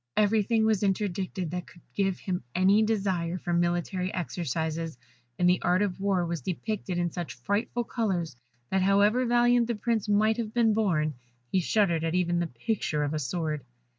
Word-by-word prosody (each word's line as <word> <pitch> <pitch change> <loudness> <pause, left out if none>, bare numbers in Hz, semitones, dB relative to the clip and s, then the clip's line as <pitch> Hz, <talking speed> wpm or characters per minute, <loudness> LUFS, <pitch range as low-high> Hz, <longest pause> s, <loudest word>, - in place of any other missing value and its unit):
Everything 220 +1 +3
was 220 -3 +2
interdicted 190 -3 -1
that 180 0 -4
could 175 - -17
give 195 -2 0
him 180 -6 -3
any 190 +4 +5
desire 190 -6 0
for 175 -1 -3
military 175 +2 0
exercises, 165 -2 -3 0.4
and 180 - +3
the 180 0 +3
art 180 +3 +2
of 195 -3 -2
war 195 -3 +1
was 170 -2 -3
depicted 185 - -3
in 175 -1 0
such 175 -1 -5
frightful 205 - -1
colours 190 - -2 0.4
that, 190 - +2
however 205 +6 +3
valiant 240 0 +4
the 235 - -1
Prince 220 -1 -1
might 215 +2 +3
have 225 -2 -4
been 230 -2 +4
born, 170 -8 +1 0.4
he 190 - +3
shuddered 175 -3 +2
at 165 +1 -1
even 175 -1 +1
the 175 - 0
picture 150 - -2
of 145 +1 -1
a 155 - -1
sword. 150 0 -2
185 Hz, 175 wpm, -28 LUFS, 170-215 Hz, 0.4 s, any